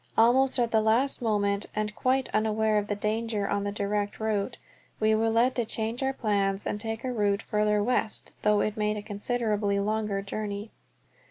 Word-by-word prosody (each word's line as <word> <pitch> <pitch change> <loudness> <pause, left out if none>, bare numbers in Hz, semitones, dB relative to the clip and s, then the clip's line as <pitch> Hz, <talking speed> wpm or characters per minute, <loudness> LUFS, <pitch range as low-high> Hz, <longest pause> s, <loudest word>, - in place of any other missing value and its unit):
Almost 255 +4 +5
at 240 -2 +1
the 220 - +4
last 235 +6 +2
moment, 205 -3 0
and 210 0 -1
quite 260 0 +1
unaware 215 0 +2
of 205 - -4
the 205 - -1
danger 215 0 -1
on 200 0 -1
the 205 - -1
direct 205 0 -2
route, 220 +1 -1 0.4
we 215 0 +3
were 225 +1 +2
led 235 +3 +3
to 240 - +2
change 225 +2 -2
our 265 0 +1
plans 200 -5 0
and 210 - -2
take 225 0 -4
a 255 -1 -2
route 205 -2 +1
farther 210 0 +1
west, 225 -2 -1
though 210 -1 +3
it 215 - -1
made 210 0 0
a 205 - -5
considerably 210 -1 -1
longer 210 -1 -1
journey. 205 +1 -5
215 Hz, 185 wpm, -28 LUFS, 205-225 Hz, 0.4 s, Almost